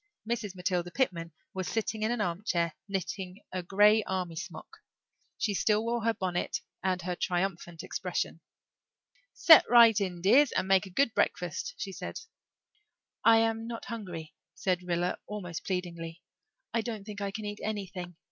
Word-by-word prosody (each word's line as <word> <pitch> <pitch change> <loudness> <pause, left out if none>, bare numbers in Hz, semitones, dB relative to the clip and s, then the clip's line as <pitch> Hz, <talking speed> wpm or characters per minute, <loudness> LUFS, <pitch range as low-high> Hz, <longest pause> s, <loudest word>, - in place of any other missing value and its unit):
Mrs. 225 -5 -2
Matilda 180 -1 -1
Pitman 170 -8 -1 0.2
was 190 -1 -3
sitting 220 -1 -2
in 215 - +1
an 240 -2 0
armchair, 170 -3 0
knitting 190 -1 -4
a 185 - -2
grey 205 +4 +5
army 180 -3 -2
sock. 160 - -8 0.6
She 210 - 0
still 210 +2 +2
wore 235 -1 -1
her 230 - +3
bonnet 180 -2 -2 0.2
and 185 -1 0
her 180 0 -2
triumphant 175 -2 -2
expression. 180 -2 -3 0.9
"Set 320 -3 +8
right 230 -3 +7
in, 180 -3 -2
dears, 245 +10 +5
and - - 0
make 190 0 +4
a - - -10
good 235 +4 +2
breakfast," 175 -3 -1
she 195 - -4
said. - - -6 1.0
"I 225 0 +7
am 225 0 0
not 230 -1 -6
hungry," 180 -9 -6 0.2
said 180 -2 0
Rilla 175 0 -1
almost 180 -5 -5
pleadingly. 170 -2 -4 0.5
"I 230 - +2
don't 220 -3 -5
think 205 0 -7
I 200 - -1
can 215 +2 -6
eat 205 0 -5
anything. 190 -4 -4
190 Hz, 155 wpm, -30 LUFS, 175-220 Hz, 1.0 s, Set